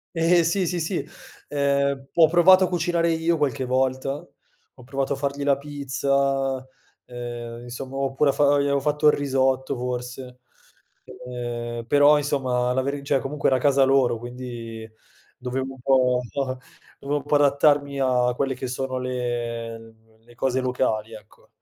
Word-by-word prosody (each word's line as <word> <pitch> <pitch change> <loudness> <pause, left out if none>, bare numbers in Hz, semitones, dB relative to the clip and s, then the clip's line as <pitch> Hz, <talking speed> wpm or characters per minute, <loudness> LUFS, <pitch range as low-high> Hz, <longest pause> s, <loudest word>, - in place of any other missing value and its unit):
Ehm, 170 +2 +4
sì, 180 +2 0
sì, 175 0 -1
sì, 170 +3 -3 0.4
ehm, 140 -1 0
ho 165 -2 +7
provato 185 +3 +6
a - - -2
cucinare 170 -1 0
io 165 +1 +1
qualche 140 -2 -1
volta, 130 +1 0 0.6
ho 125 - -16
provato 135 +2 -2
a - - -2
fargli 140 +1 -3
la 140 -1 +3
pizza, 140 -2 -1 0.4
ehm, 120 -1 -7
insomma, 130 +2 -7
ho 135 0 -1
pure 140 +1 +2
fa 145 - +1
o 145 0 +4
gli - - +2
avevo 140 -1 +1
fatto 150 +1 +1
il 150 - +7
risotto 130 -1 0
forse, 125 +1 -6 0.9
ehm, 120 -1 -5
però 145 +4 +5
insomma 130 -4 0
la 130 - +1
veri 140 +1 -3
cioè, 140 -1 +2
comunque 145 +1 -2
era 130 - +3
casa 135 +1 +3
loro, 135 -3 +3
quindi 120 -2 -8 0.5
dovevo 130 +1 -4
un - - -18
po 125 -1 +3
un 120 - -11
po 130 -2 -3 0.4
dovevo 145 +1 -2
un - - -11
po' 145 - +1
adattarmi 145 0 +3
a 125 -1 +2
quelle 135 +1 -1
che 130 0 -5
sono 130 +1 -3
le 120 -2 -4 0.3
le 120 +1 -19
cose 130 +1 0
locali, 115 -4 -1
ecco. 105 -1 -15
135 Hz, 165 wpm, -24 LUFS, 125-145 Hz, 0.9 s, ho